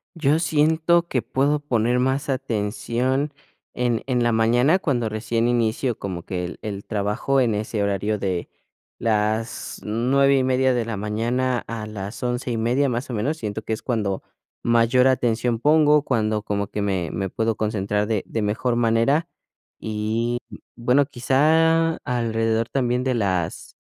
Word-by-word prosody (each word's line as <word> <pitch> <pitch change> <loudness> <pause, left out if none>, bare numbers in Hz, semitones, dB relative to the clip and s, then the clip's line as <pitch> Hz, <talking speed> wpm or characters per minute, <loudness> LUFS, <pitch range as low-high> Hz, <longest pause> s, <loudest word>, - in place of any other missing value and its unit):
Yo 155 -1 +2
siento 160 +2 +2
que 130 -7 0
puedo 145 +5 +1
poner 125 -3 +1
más 130 +3 0
atención 130 +2 -1 0.4
en 120 -2 0
en 125 -2 +1
la 120 - +2
mañana 120 +9 +3
cuando 125 -10 0
recién 115 +2 -1
inicio 120 0 0
como 90 -3 -5
que 90 -1 -3
el 90 - -8
el 100 -2 -5
trabajo 105 +6 0
en 120 -4 +2
ese 105 0 -2
horario 100 +1 0
de 95 -3 -2 0.5
las 110 +1 -1
9:30 130 +3 +2
de 120 -1 0
la 115 -2 -4
mañana 120 +5 -1
a 115 -2 -5
las 105 +1 -7
11:30 120 +2 0
más 120 +2 -3
o - - -4
menos, 125 +9 -1
siento 110 -6 -4
que 110 - -7
es 110 - -4
cuando 105 -6 -1 0.4
mayor 120 +2 +4
atención 120 -2 +1
pongo. 150 +2 +4
Cuando 110 -5 0
como 100 -1 -2
que 105 - -4
me 95 -5 -1
me 95 -1 -3
puedo 110 +3 -1
concentrar 105 -1 -1
de 110 -3 -1
de 115 - -3
mejor 110 +4 0
manera, 120 +8 +2 0.5
y 110 +3 -2 0.4
bueno, 125 +4 +3
quizá 160 +5 +2
alrededor 115 -2 -1
también 125 -2 0
de 130 0 0
las 95 -7 -1
120 Hz, 150 wpm, -23 LUFS, 110-130 Hz, 0.5 s, mayor